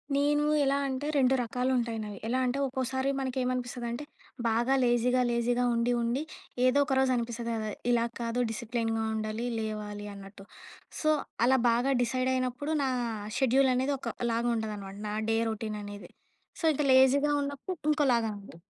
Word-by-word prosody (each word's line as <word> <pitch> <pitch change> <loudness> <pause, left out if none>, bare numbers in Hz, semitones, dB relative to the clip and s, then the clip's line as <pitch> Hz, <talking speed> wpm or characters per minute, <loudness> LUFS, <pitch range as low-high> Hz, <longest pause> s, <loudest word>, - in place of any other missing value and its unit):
నేను 295 +1 +2 0.2
ఎలా 275 0 +2
అంటే 270 +2 -3
2 260 -1 +4
రకాలు 250 +2 -1
ఉంటాయి 230 -2 -1
నావి. 205 -2 -7
ఎలా 255 +3 +1
అంటే? 250 +2 0
ఒక్కోసారి 260 +1 -1
మనకేమనిపిస్తదంటే 250 -1 -2 0.4
బాగా 235 +4 +2
లేజీగా, 245 +1 +3
లేజీగా 240 +1 +1
ఉండి, 235 +1 +1
ఉండి 240 +5 0 0.4
ఏదో 255 +2 +4
ఒక 270 - -1
రోజు 265 -1 +3
అనిపిస్తుంది 235 0 -3
కదా! 215 -1 -3 0.2
ఇలా 235 -1 +3 0.2
కాదు. 230 +1 -1
డిసిప్లిన్‌గా 225 0 -2
ఉండాలి. 215 +2 -3
లేవాలి 210 -1 -4
అన్నట్టు. 195 0 -11 0.5
సో, 310 - +1 0.4
అలా 265 +2 +5
బాగా 245 +4 +2
డిసైడ్ 255 +2 0
అయినప్పుడు 255 +4 -1
నా 265 - +1 0.5
షెడ్యూల్ 265 0 +4
అనేది 260 +3 +1
ఒకలాగా 235 -2 -2
ఉండదనమాట. 210 -3 -5
నా 210 - -3 0.2
డే 225 - +2
రొటీన్ 215 -1 -4
అనేది. 205 0 -9 0.5
సో, - - 0
ఇక 295 - -1
లేజీగా 270 +3 +5
ఉన్నప్పుడు 285 +6 -4
ఇంకోలాగా 245 -7 +2
ఉంది. 200 -4 -13
245 Hz, 150 wpm, -29 LUFS, 225-265 Hz, 0.5 s, అలా